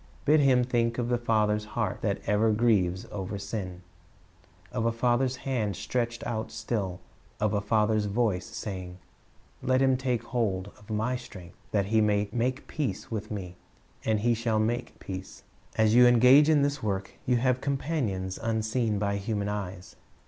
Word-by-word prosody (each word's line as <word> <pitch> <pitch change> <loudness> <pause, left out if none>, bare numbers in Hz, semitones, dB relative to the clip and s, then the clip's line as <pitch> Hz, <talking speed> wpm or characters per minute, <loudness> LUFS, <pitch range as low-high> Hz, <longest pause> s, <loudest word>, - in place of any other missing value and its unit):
Bid 155 +2 +5
him 130 -3 +4
think 120 -1 0
of 120 -1 -1
a 120 - +3
Father's 105 -2 +1
heart 105 -4 -1
that 100 -2 -1
ever 105 +2 +3
grieves 105 -5 +2
over 100 +1 -4
sin, 95 -3 -5 0.9
of 115 - -2
a - - +2
Father's 125 +2 +1
hand 120 -8 -2
stretched 120 +4 -2
out 110 -2 -3
still, 105 -5 -3 0.4
of 105 0 +1
a 100 - +1
Father's 105 0 +2
voice 100 -4 0
saying, 90 -3 -6 0.6
"Let 130 0 +2
him 130 -1 +4
take 125 -3 -1
hold 100 -6 -1
of 105 0 -19
My 110 +4 0
strength, 90 -7 -11
that 100 -2 +1
he 110 +2 +2
may 105 -1 +2
make 125 +4 -1
peace 120 -11 -3
with 110 -1 -4
Me; 90 -4 -6 0.5
and 110 -1 +1
he 120 +2 +3
shall 115 -1 0
make 120 +3 -1
peace."' 95 0 -8 0.3
As 110 -1 +3
you 125 +1 +8
engage 125 +5 +7
in 150 -3 +4
this 140 -1 0
work, 100 -3 -2 0.2
you 125 -1 +3
have 125 +1 +1
companions 130 - -2
unseen 110 0 0
by 100 0 0
human 100 0 -2
eyes. 95 -3 -6
110 Hz, 165 wpm, -28 LUFS, 100-120 Hz, 0.9 s, you